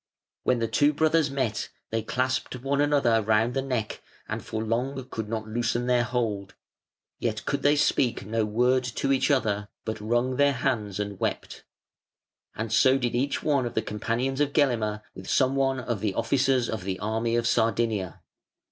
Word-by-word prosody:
When 125 - +2
the 115 -1 0
two 145 +6 +3
brothers 155 0 +2
met 130 -6 -2 0.2
they 115 0 0
clasped 130 +4 -1
one 135 +3 0
another 140 -6 +3
round 110 +3 +2
the 135 - 0
neck 125 -5 -3 0.3
and - - -4
for 110 0 -4
long 125 +4 -2
could 110 -2 -4
not 110 -1 -3
loosen 120 +2 -1
their 125 -1 +3
hold, 110 -5 -2 0.6
yet - - -2
could - - -1
they 145 +1 +4
speak 130 -7 +1
no 110 +2 0
word 125 +4 +2
to 125 +3 -1
each 135 +2 +1
other, 105 -7 +1 0.2
but 110 -1 -4
wrung 120 +4 0
their 145 0 +4
hands 110 -7 -1
and 100 -2 -4
wept; - - -3 0.9
and 110 0 -3
so 130 +4 +5
did 125 -3 -1
each 135 +3 -1
one 140 -5 +2
of 120 - -8
the 110 - +1
companions 120 +6 -2
of 145 -1 +1
Gelimer 110 -7 +1
with - - -9
some 130 0 +3
one 135 -1 +1
of 120 -3 -3
the 105 -2 -2
officers 130 -2 +2
of 110 -5 -4
the 95 0 -3
army 110 +3 -1
of 120 0 +1
Sardinia. 110 -4 0
120 Hz, 180 wpm, -26 LUFS, 110-135 Hz, 0.9 s, so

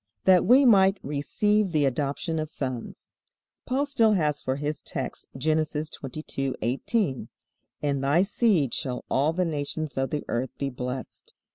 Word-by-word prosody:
That 185 -1 +5
we 265 +3 +7
might 195 -4 +6
receive 195 +8 +1
the 150 -3 +2
adoption 145 +5 -1
of 155 -1 -3
sons. 130 -6 -6 0.5
Paul 270 +3 +1
still 230 -6 +3
has 150 -6 +1
for 130 - -1
his 145 +1 -3
text - - -5
Genesis 155 +1 0
22:18, 135 - -2 0.6
"In 140 -2 0
thy 145 +6 +3
seed 195 - +2
shall 125 -2 -3
all 145 +4 +3
the 180 +2 0
nations 150 -2 -3
of 135 - 0
the 150 - -3
earth 120 +2 -3
be 140 -1 -2
blessed." 125 +1 -6
150 Hz, 145 wpm, -26 LUFS, 135-185 Hz, 0.6 s, we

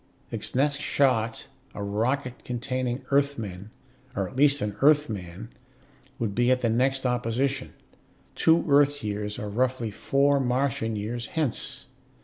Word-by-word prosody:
Its 110 0 -3
next 140 +2 +2
shot, 115 -7 +1 0.3
a 100 - -4
rocket 125 +6 -1
containing 125 +1 -3
Earthmen, 115 -9 0 0.5
or 100 -4 -1
at - - -12
least 140 +1 +4
an 105 -1 -3
Earthman, 110 - +1 0.7
would 115 -6 -2
be 120 +3 +2
at 130 0 +3
the 115 - +2
next 130 +3 +1
opposition, 125 +2 -1 0.6
two 165 +1 +3
Earth 145 -1 +4
years, 105 0 -3
or 105 - -4
roughly 120 +1 -1
four 140 +6 +2
Martian 125 -3 0
years, 115 +3 -4
hence. 155 -8 -3
125 Hz, 130 wpm, -26 LUFS, 110-140 Hz, 0.7 s, least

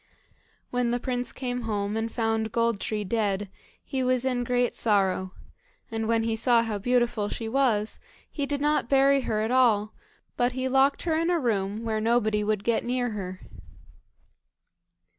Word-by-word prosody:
When 245 -1 0
the 240 +1 0
prince 250 -1 -2
came 250 -1 -4
home, 210 -2 -2
and 225 +1 -2
found 225 -1 -1
Gold 230 -2 +1
tree 210 +1 -2
dead, 205 -1 -1 0.3
he 265 - -3
was 255 0 +1
in 250 -2 0
great 245 0 +1
sorrow, 190 -3 +1 0.6
and 225 0 -2
when 230 0 +2
he 225 0 0
saw 230 +1 +3
how 215 -3 -3
beautiful 240 -2 +1
she 225 - -5
was, 225 -4 +1 0.3
he 285 -2 -4
did 285 0 -2
not 295 -4 +1
bury 275 0 +4
her 215 -4 -1
at 220 +2 -1
all, 220 -5 +3 0.4
but 245 0 +1
he 260 +1 -2
locked 270 +2 +2
her 325 -2 0
in 330 +2 +1
a 350 - +2
room 215 -5 -1
where 220 -1 -1
nobody 220 -2 +2
would 210 -1 -1
get 235 0 +1
near 245 -1 -1
her. 185 -3 -6
230 Hz, 170 wpm, -26 LUFS, 215-250 Hz, 0.6 s, bury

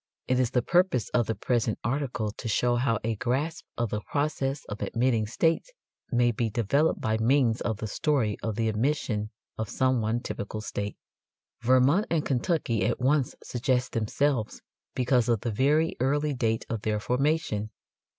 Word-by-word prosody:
It 130 0 +2
is 125 -3 +2
the 125 -1 +1
purpose 175 - +2
of 120 -2 +1
the 110 - -1
present 115 +1 0
article 125 -3 -1
to 115 - -7
show 120 +2 +2
how 120 -2 +1
a 115 +1 0
grasp 135 +8 -1
of 120 -2 -1
the 105 - -2
process 140 +1 -2
of 105 - -7
admitting 115 -3 +1
states 165 - +1 0.4
may 120 -1 +3
be 115 0 -1
developed 120 +9 +1
by 110 0 0
means 120 0 +3
of 110 -3 -1
the 110 - -5
story 110 -1 0
of 110 -2 -2
the 115 0 0
admission 110 -2 0 0.3
of 110 -2 -2
some 130 -2 +1
one 110 +2 0
typical 110 -3 -5
state. 105 -1 -4 0.6
Vermont 130 - +4
and 160 -3 0
Kentucky 125 - 0
at - - 0
once 135 +1 +1
suggest 125 0 0
themselves 115 +1 -1 0.3
because 125 -2 +2
of 115 -3 +2
the 120 - -2
very 150 +8 +2
early 145 +3 +1
date 115 -4 0
of 115 -3 -3
their 105 -1 0
formation. 125 -3 0
120 Hz, 170 wpm, -27 LUFS, 110-140 Hz, 0.6 s, Vermont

